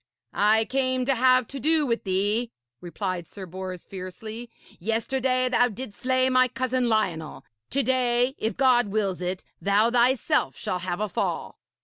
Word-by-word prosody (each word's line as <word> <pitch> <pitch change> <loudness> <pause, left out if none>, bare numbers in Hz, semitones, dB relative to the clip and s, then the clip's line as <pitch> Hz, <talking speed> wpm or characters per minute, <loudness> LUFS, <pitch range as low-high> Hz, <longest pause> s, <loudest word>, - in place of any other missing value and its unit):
'I 220 +2 +3
came 255 0 0
to 275 - +3
have 255 -1 +4
to 275 - -6
do 310 +3 +3
with 230 -4 -1
thee,' 205 +5 0 0.3
replied 175 0 -4
Sir 195 - -9
Bors 185 0 -7
fiercely. 215 +5 -7 0.3
'Yesterday 255 +5 0
thou 245 0 +4
didst 230 -1 -8
slay 255 0 +2
my 255 0 +4
cousin 255 -1 0
Lionel. 180 -8 -1 0.2
To 275 +1 +1
day, 250 0 +2
if 220 - -2
God 250 -4 +4
wills 195 -3 -1
it, 180 +1 -3 0.2
thou 205 +4 +3
thyself 240 - +2
shall 180 - -2
have 180 +2 -3
a 215 - 0
fall.' 195 - -3
230 Hz, 155 wpm, -25 LUFS, 195-255 Hz, 0.3 s, have